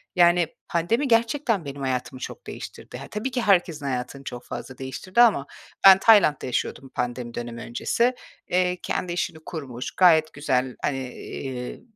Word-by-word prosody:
Yani, 175 -1 +5 0.2
pandemi 225 - 0
gerçekten 230 - +1
benim 140 0 -7
hayatımı 130 -1 -2
çok - - -8
değiştirdi. - - -8
Ha, 135 - -9
tabii 220 +5 -3
ki 245 - -1
herkesin 175 -8 +2
hayatını 130 +1 -3
çok 125 -2 -7
fazla 130 - -7
değiştirdi 135 - -1
ama 220 -12 +5 0.4
ben 190 -1 +11
Tayland'da 200 -10 +5
yaşıyordum 130 +1 -3
pandemi 120 -1 -4
dönemi 120 0 -6
öncesi. 235 - 0 0.3
Eee, 180 0 +1
kendi 175 -1 -2
işini 170 -2 -2
kurmuş, 130 -7 -6
gayet 160 -4 +4
güzel, 130 -3 -1
hani, 135 -2 -1
eee, 125 -2 -6
155 Hz, 150 wpm, -24 LUFS, 130-190 Hz, 0.4 s, ben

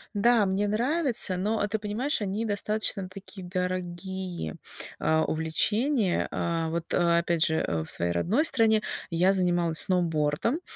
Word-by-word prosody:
Да, 225 +1 +4
мне 195 +2 0
нравится, 240 - +1
но 205 +3 0
ты 215 +1 -1
понимаешь, 220 +7 -2
они 205 +3 -2
достаточно 205 -2 -1
такие 190 0 -10
дорогие, 180 - -4 0.4
а, 160 0 +1
увлечения. 205 - 0
А, 165 -1 -1
вот 165 +1 -4
опять 170 -1 +2
же, 160 - +1
э, 80 - -1
в - - -9
своей 85 0 0
родной 210 - +1
стране 225 -7 +3 0.3
я 180 +3 +3
занималась 175 -3 +2
сноубордом, 170 - 0
190 Hz, 135 wpm, -27 LUFS, 170-215 Hz, 0.4 s, Да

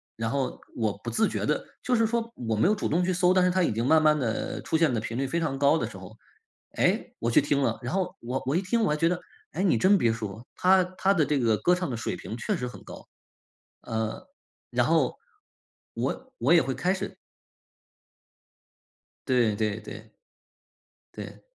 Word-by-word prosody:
然 115 0 -2
后 135 +1 -2 0.2
我 110 -4 -1
不 120 +3 -6
自 220 - +2
觉 - - -2
地 - - 0 0.2
就 250 - +1
是 225 - +3
说 230 +1 -2
我 115 -2 -3
没 140 - +3
有 215 - +3
主 205 - -2
动 175 +4 +1
去 185 - +1
搜， 180 +1 +3
但 185 -1 +4
是 180 - +3
她 185 0 +2
已 - - +1
经 115 +3 -1
慢 160 +3 +5
慢 155 -1 +4
地 115 -4 -2
出 160 - 0
现 160 -5 +3
的 115 - 0
频 115 +2 -5
率 135 0 0
非 170 +5 -1
常 155 -5 -1
高 145 +3 +4
的 115 -6 -2
时 100 - -10
候， 95 +4 -12 0.6
诶， - - +1
我 115 - 0
去 - - +5
听 140 0 +1
了， - - 0
然 120 - -4
后 190 -2 -1
我 125 +3 -3
我 135 - 0
一 180 - +2
听 225 +5 0
我 210 - +2
还 150 - +2
觉 165 +2 +2
得 180 - -1 0.3
诶， 175 - -2
你 195 - +3
真 195 +2 +5
别 115 -10 +2
说， 110 +1 -6
她 185 0 +4
她 195 +1 +3
的 160 -6 +2
这 145 -1 +1
个 115 -4 +2
歌 180 - +3
唱 180 -3 -3
的 120 - -3
水 115 - -3
平 115 - -7
确 115 - -1
实 125 - -3
很 125 - -10
高。 - - -11 0.7
呃， 110 -1 -4 0.4
然 - - +1
后， - - +2 0.8
我 260 0 -3
我 - - +3
也 170 - +7
会 130 - -2
开 185 +2 +1
始 195 +1 -5 2.1
对 120 -5 +3
对 105 0 -1
对。 110 - -10 1.0
对。 - - -9
145 Hz, 230 characters per minute, -27 LUFS, 115-180 Hz, 2.1 s, 也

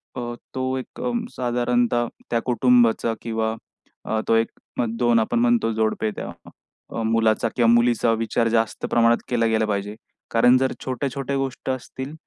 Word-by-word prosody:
अ, 120 -1 -4 0.2
तो 130 0 -1
एक 130 - -8
अ, 245 - -1 0.2
साधारणतः 120 -1 +1 0.2
त्या 115 -1 +1
कुटुंबाचा 120 -2 +3
किंवा 110 -1 -2 0.5
अ, 110 - -1
तो 115 - +4
1-2 115 +1 0
आपण 115 +2 0
म्हणतो 120 -1 +2
जोडपे, 110 0 0
त्या - - -6 0.7
मुलाचा 110 0 +2
किंवा 115 -2 +3
मुलीचा 120 0 +3
विचार 115 +1 0
जास्त 115 -1 0
प्रमाणात 115 0 +4
केला 120 -2 +1
गेला 110 -1 +2
पाहिजे. 105 0 -2 0.4
कारण 125 +2 +5
जर 130 0 +1
छोट्या-छोट्या 135 +1 -3
गोष्टी 135 -1 -3
असतील 130 +2 -6
120 Hz, 140 wpm, -23 LUFS, 115-125 Hz, 0.7 s, कारण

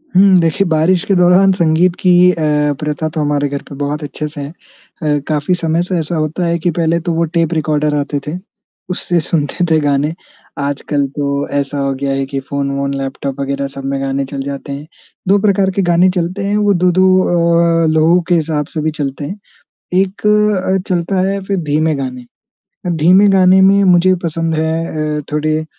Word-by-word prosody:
हुँ 190 0 +6
देखिए 165 +4 +1
बारिश 165 +2 +2
के 195 - +1
दौरान 180 +2 +5
संगीत 170 0 +2
की 180 -1 +3 0.2
अ, 150 -3 0
प्रथा 150 +1 -2
तो 155 0 -3
हमारे 145 -1 0
घर 140 0 -4
पे 140 - -8
बहुत 145 +2 -3
अच्छे 150 +1 -5
से 150 -1 -8
है। 140 - -6
अ, 150 -3 -5
काफ़ी 150 +3 0
समय 165 -1 -1
से 180 -1 -2
ऐसा 160 +2 -3
होता 155 +3 -2
है 170 0 0
कि 175 +1 0
पहले 170 0 +1
तो 170 +1 -3
वो 165 +1 +1
टेप 165 0 +1
रिकॉर्डर 150 -1 0
आते 145 0 -2
थे। 160 +4 -3 0.5
उससे 175 -1 -1
सुनते 160 +2 -1
थे 160 - +4
गाने। 145 +1 0 0.5
आजकल 140 0 -1
तो 140 0 -1
ऐसा 140 +1 -3
हो 140 0 0
गया 135 +1 -2
है 135 0 -1
कि 135 0 -4
फ़ोन-वोन, 140 0 -3
लैपटॉप 135 0 -5
वगैरह 140 0 -2
सब 135 0 -7
में 135 0 -2
गाने 135 0 -2
चल 135 +1 -6
जाते 140 0 -6
हैं। 145 +2 -7 0.4
दो 200 +2 +4
प्रकार 200 -1 +2
के 195 - -1
गाने 180 +2 +4
चलते 180 +3 -2
हैं, 205 +1 0
वो 205 -1 +2
2-2 180 +1 +2 0.8
अ, - - +3
लोगों 160 +3 +4
के 175 - +4
हिसाब 155 -2 -1
से 155 - -2
भी 155 +1 -1
चलते 140 +1 -4
हैं। 195 +8 -7 0.6
एक 195 +2 -3
अ, 210 -3 +2
चलता 180 +1 0
है 200 0 -2
फ़िर 195 -1 -1
धीमे 155 0 +1
गाने। 125 -2 -5 0.6
अब 175 -2 -1
धीमे 185 +6 +5
गाने 190 0 +5
में 200 +1 +5
मुझे 185 0 +4
पसंद 165 0 -2
है 160 -1 -2
अ, - - -5
थोड़े 155 +1 -1
160 Hz, 195 wpm, -15 LUFS, 145-180 Hz, 0.8 s, हुँ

